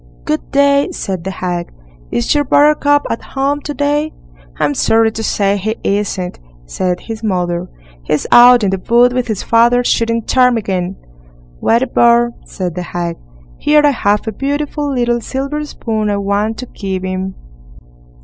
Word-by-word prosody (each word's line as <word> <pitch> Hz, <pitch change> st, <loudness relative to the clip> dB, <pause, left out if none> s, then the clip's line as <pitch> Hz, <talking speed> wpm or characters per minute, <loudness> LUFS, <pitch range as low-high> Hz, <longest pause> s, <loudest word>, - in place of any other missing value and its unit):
"Good 155 Hz, -, -3 dB
day!" 280 Hz, +3 st, +3 dB
said 190 Hz, -, -4 dB
the -, -, -2 dB
hag, 180 Hz, -2 st, -4 dB, 0.4 s
"is 120 Hz, -, 0 dB
your 290 Hz, -, +2 dB
Buttercup 290 Hz, +1 st, +3 dB
at 230 Hz, -, -3 dB
home 275 Hz, +2 st, -2 dB
to 295 Hz, -, -5 dB
day?" 295 Hz, +2 st, 0 dB, 0.4 s
"I'm 145 Hz, -, +1 dB
sorry 225 Hz, +9 st, +2 dB
to 220 Hz, -, -5 dB
say 200 Hz, -2 st, +1 dB
he 215 Hz, +3 st, -2 dB
isn't", 195 Hz, -3 st, -2 dB, 0.3 s
said 180 Hz, -, -2 dB
his 225 Hz, -1 st, -7 dB
mother; 180 Hz, -3 st, -1 dB, 0.3 s
"he's 145 Hz, -, -1 dB
out 245 Hz, -1 st, +7 dB
in 195 Hz, -, +1 dB
the 195 Hz, -, -1 dB
wood 240 Hz, +5 st, +3 dB
with 250 Hz, -1 st, -1 dB
his 215 Hz, -4 st, -3 dB
father, 240 Hz, +2 st, +3 dB
shooting 230 Hz, -1 st, 0 dB
ptarmigan." 210 Hz, -8 st, +1 dB, 0.6 s
"What 230 Hz, +3 st, +2 dB
a -, -, -2 dB
bore", 235 Hz, 0 st, +3 dB
said 180 Hz, -4 st, -4 dB
the 180 Hz, -, -4 dB
hag; 175 Hz, -1 st, -4 dB, 0.4 s
"here 300 Hz, 0 st, +4 dB
I 290 Hz, -, +5 dB
have 205 Hz, -5 st, 0 dB
a -, -, -1 dB
beautiful 285 Hz, +4 st, -2 dB
little 240 Hz, -2 st, 0 dB
silver 275 Hz, +5 st, -3 dB
spoon 220 Hz, -7 st, -3 dB
I 205 Hz, -, 0 dB
want 200 Hz, +2 st, -1 dB
to 255 Hz, -, -6 dB
give 190 Hz, -5 st, -5 dB
him." 185 Hz, 0 st, -3 dB
225 Hz, 165 wpm, -15 LUFS, 190-265 Hz, 0.6 s, out